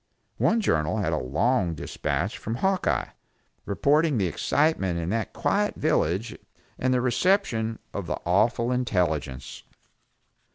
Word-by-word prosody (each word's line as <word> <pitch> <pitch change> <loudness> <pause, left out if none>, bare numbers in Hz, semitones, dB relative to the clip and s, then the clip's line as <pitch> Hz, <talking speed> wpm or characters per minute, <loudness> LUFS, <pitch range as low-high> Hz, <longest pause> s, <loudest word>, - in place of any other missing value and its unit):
One 230 0 +3
journal 75 - +1
had - - 0
a - - +1
long 85 - +1
dispatch - - -2
from 110 - -4
Hawkeye, 190 +8 0 0.6
reporting 145 +7 +2
the 100 - +1
excitement 95 - +1
in 85 0 -2
that 115 0 -1
quiet 205 +1 0
village 110 - 0 0.4
and 130 - +1
the 125 -1 +2
reception 125 - +1 0.2
of 100 -4 -4
the - - -2
awful 115 +7 +2
intelligence. 80 - -1
115 Hz, 125 wpm, -26 LUFS, 90-145 Hz, 0.6 s, One